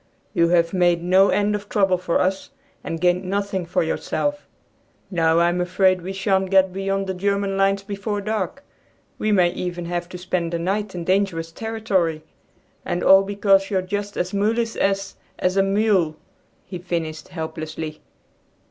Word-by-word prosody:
"You 170 -4 +3
have 170 0 +2
made 175 -2 +2
no 185 +2 +5
end 205 0 +2
of 205 0 -4
trouble 190 -3 +2
for 180 -2 0
us, 190 +1 -1 0.3
and 165 - -4
gained 180 +1 +2
nothing 195 -1 -2
for 170 - +1
yourself! 290 - -2 0.6
Now 165 -2 +2
I 170 0 +4
am 175 +1 -1
afraid 185 +1 +2
we 185 +3 -5
shan't 190 -1 0
get 190 -1 +4
beyond 195 0 -1
the 190 - -3
German 200 +1 -1
lines 195 0 +2
before 205 +1 -3
dark. 215 +5 -3 0.6
We 215 - 0
may 180 -4 +4
even 175 -1 -4
have 175 0 -3
to 180 - -7
spend 180 -2 -2
the - - +1
night 195 +3 -2
in 175 - -4
dangerous 185 -3 0
territory, 190 -7 -1 0.6
and 175 - -2
all 195 0 +7
because 195 -1 +2
you're 190 -3 0
just 205 +2 -4
as 180 +2 -2
mulish 225 +3 0
as, 195 0 -1 0.2
as 180 +1 0
a 195 - +4
mule," 195 -5 +2 0.5
he 180 -1 -7
finished 165 -3 -4
helplessly. 160 -2 -6
190 Hz, 165 wpm, -22 LUFS, 175-200 Hz, 0.6 s, all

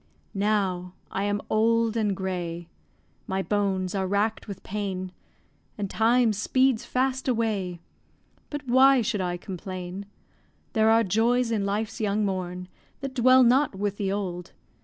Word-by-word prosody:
Now 195 -3 0 0.2
I 195 - -1
am 205 0 -1
old 230 +1 +2
and 210 -3 +1
grey, 175 -3 -4 0.6
My 190 0 -1
bones 195 -3 0
are 190 -2 -1
rack'd 205 +4 0
with 200 - -8
pain, 190 -2 -4 0.7
And 200 -2 -3
time 230 +1 +3
speeds 255 +3 +2
fast 260 +1 -1
away 210 -8 -1 0.7
But 290 -1 -5
why 260 0 +5
should 205 -2 -1
I 175 -1 -2
complain? 185 +1 -7 0.7
There 220 0 +4
are 225 +1 +5
joys 230 +4 +2
in 205 -3 0
life's 210 +3 -2
young 210 0 +1
morn 180 -2 -3 0.3
That 275 -1 -4
dwell 255 +1 +6
not 255 0 +3
with 200 +1 -2
the 195 -2 -1
old. 180 -3 -4
205 Hz, 140 wpm, -26 LUFS, 190-230 Hz, 0.7 s, dwell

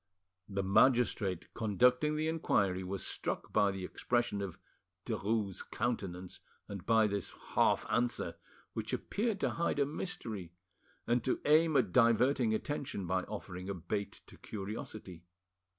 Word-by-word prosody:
The 100 -1 -1
magistrate 100 -3 +3
conducting 125 +7 +3
the 155 +1 0
inquiry 100 - +1
was 95 +1 -4
struck - - -3
by 100 - +4
the 95 -1 -4
expression 120 -1 0
of 95 -4 -5 0.5
Derues' 105 -2 -1
countenance 95 -7 -3 0.3
and 100 -2 -6
by 110 -1 +5
this 100 -2 -1 0.2
half - - +3
answer, 120 0 0 0.4
which - - -4
appeared 215 -1 -1
to - - +2
hide 170 -3 0
a 140 - +3
mystery 115 - -5 0.5
and 120 0 +2
to 130 - 0
aim 155 0 +5
at 110 -8 +2
diverting 120 +1 +4
attention 130 -2 -2
by 95 +1 0
offering 95 -3 -6
a 100 - -2
bait 100 +4 -4
to - - -16
curiosity. 100 -3 -7
110 Hz, 135 wpm, -33 LUFS, 95-125 Hz, 0.5 s, by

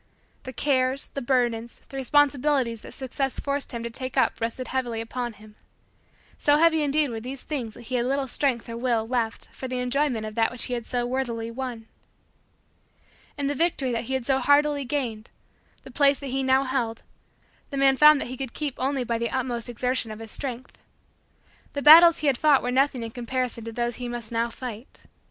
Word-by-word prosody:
The 260 - -5
cares, 260 0 0
the 275 - -5
burdens, 240 -2 0
the - - -10
responsibilities 270 -3 +2
that - - -11
Success 270 0 -3
forced 280 0 -2
him 235 -2 -5
to 235 - -3
take 255 +2 -6
up - - +2
rested 230 +2 -3
heavily 245 -3 -2
upon 240 +1 -4
him. 210 0 -16 0.9
So 290 - +4
heavy 320 0 +4
indeed 295 -1 +1
were 225 - -4
these 255 +4 -7
things 245 -8 -4
that 240 - -12
he 255 - -9
had 245 -1 +1
little 275 +1 0
strength 255 -2 0
or 230 - -6
will 235 -2 0
left 230 -2 -2
for 260 - -6
the 255 0 -3
enjoyment 250 -2 0
of 215 - -6
that 225 0 +1
which 250 - -5
he 250 - -4
had 235 -2 -4
so 245 -1 -1
worthily 240 -3 -3
won. 240 -2 -6 1.5
And 285 -1 -1
the 285 - 0
victory 290 -4 0
that 230 0 -2
he 265 - -2
had 260 -3 -3
so 265 0 +2
hardily 285 0 +3
gained, 240 -5 -3 0.5
the 265 - -11
place 280 +1 +3
that 280 - -7
he 270 - 0
now 265 0 +3
held, 245 -4 -2 0.7
the 280 - -5
man 270 0 +4
found 300 +1 +7
that - - -4
he 255 - -6
could 265 -2 -5
keep 295 -3 -3
only 270 0 0
by 235 -1 -2
the 235 0 -1
utmost 245 -2 -2
exertion 250 0 -1
of 215 - -7
his 225 -1 -9
strength. 255 -2 -5 0.9
The 285 - -3
battles 330 +2 +9
he - - -4
had 265 -3 +2
fought 295 -3 +4
were 245 - -1
nothing 265 -1 +1
in 225 - -6
comparison 245 -1 -3
to 230 - -5
those 240 0 -2
he 245 -1 -5
must 240 -2 -6
now 230 +1 0
fight. 235 0 -9
255 Hz, 205 wpm, -25 LUFS, 235-275 Hz, 1.5 s, battles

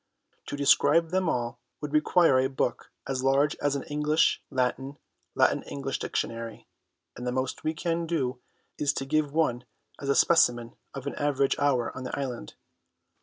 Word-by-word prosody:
To 145 - -4
describe 160 +3 +4
them 185 -2 +1
all 120 -2 -2 0.2
would 150 -1 -6
require 155 -2 +4
a 130 0 +1
book 130 -2 -2 0.2
as 130 -1 -2
large 140 +2 +3
as 145 -1 0
an 140 - -3
English 150 +2 +1
Latin, 130 +1 -1 0.4
Latin - - +3
English 135 -1 -4
Dictionary, 115 -1 -4 0.5
and 125 - -6
the - - 0
most 130 +1 -3
we 155 +1 -1
can 170 +1 -2
do 130 -6 -2 0.4
is 145 -1 +1
to 135 - -3
give 150 +1 0
one 140 -6 +1 0.4
as 140 - -5
a 140 - +3
specimen 120 -8 +3 0.2
of - - -6
an - - -3
average 140 -2 +1
hour 135 -4 +1
on 130 - -6
the 125 - -4
island. 125 - -5
140 Hz, 170 wpm, -27 LUFS, 130-150 Hz, 0.5 s, describe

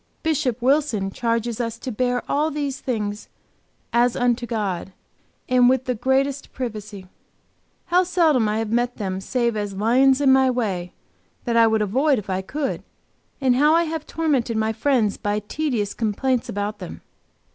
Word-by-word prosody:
Bishop 275 -7 0
Wilson 255 -8 +1
charges 230 +1 -1
us 230 -1 -3
to 255 - -6
bear 245 +2 0
all 300 +2 +1
these 285 -3 -3
things 210 -4 -3 0.6
"as 240 +1 +3
unto 245 -1 0
God," 195 -5 -3 0.5
and 250 -1 +5
"with 260 0 +1
the 250 - 0
greatest 265 +4 0
privacy." 210 -5 -6 0.8
How 355 +1 +3
seldom 320 - +2
I 210 - 0
have 220 -1 -2
met 240 +1 0
them 190 -3 -3
save 235 +2 0
as 205 -2 -3
lions 255 +6 +4
in 275 -2 +5
my 265 0 +4
way, 195 -8 -2 0.5
that 235 -2 -1
I 230 -1 +6
would 220 -1 +2
avoid 265 +8 +2
if 200 -3 -5
I 185 0 -1
could, 280 +8 -3 0.6
and 260 -3 +3
how 300 +3 +5
I 335 - +4
have 320 -1 -4
tormented 275 -8 0
my 220 0 0
friends 230 -5 +1
by 205 0 -1
tedious 215 -1 -2
complaints 240 +3 -1
about 205 +1 -3
them! - - -8
240 Hz, 165 wpm, -22 LUFS, 215-270 Hz, 0.8 s, I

